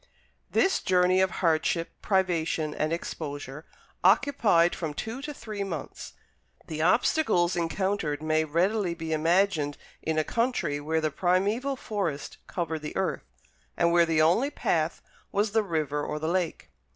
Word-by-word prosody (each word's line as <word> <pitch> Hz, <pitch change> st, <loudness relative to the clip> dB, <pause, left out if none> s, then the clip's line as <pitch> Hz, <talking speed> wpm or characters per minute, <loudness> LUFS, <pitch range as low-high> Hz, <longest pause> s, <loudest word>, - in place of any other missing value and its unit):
This 385 Hz, -, +2 dB
journey 185 Hz, 0 st, +3 dB
of 190 Hz, -, +3 dB
hardship, 165 Hz, -1 st, 0 dB
privation, 165 Hz, -5 st, 0 dB
and 155 Hz, +1 st, -1 dB
exposure 145 Hz, -3 st, -5 dB, 0.4 s
occupied 195 Hz, -4 st, +4 dB
from 155 Hz, -4 st, -4 dB
two 225 Hz, -, -5 dB
to 295 Hz, +1 st, -5 dB
three 215 Hz, -8 st, -5 dB
months. 170 Hz, -7 st, -6 dB, 0.5 s
The 155 Hz, -1 st, -4 dB
obstacles 180 Hz, -, +3 dB
encountered 175 Hz, -2 st, -1 dB
may 155 Hz, 0 st, +2 dB
readily 175 Hz, +4 st, 0 dB
be 160 Hz, -1 st, -4 dB
imagined 160 Hz, -2 st, +2 dB, 0.2 s
in 160 Hz, 0 st, -1 dB
a 155 Hz, -, +3 dB
country 230 Hz, -, -1 dB
where 160 Hz, +2 st, -1 dB
the 155 Hz, -1 st, 0 dB
primeval 200 Hz, -, +1 dB
forest 195 Hz, -, -4 dB
covered 165 Hz, -3 st, -3 dB
the 150 Hz, -, -5 dB
earth, -, -, -1 dB, 0.5 s
and 170 Hz, 0 st, +3 dB
where 170 Hz, 0 st, +4 dB
the 160 Hz, -1 st, +3 dB
only 190 Hz, -, +3 dB
path -, -, -1 dB, 0.3 s
was 205 Hz, +1 st, +1 dB
the 220 Hz, +1 st, +3 dB
river 155 Hz, -6 st, -1 dB
or 150 Hz, -, -3 dB
the 155 Hz, +1 st, -3 dB
lake. 175 Hz, -, -2 dB
170 Hz, 145 wpm, -27 LUFS, 155-200 Hz, 0.5 s, occupied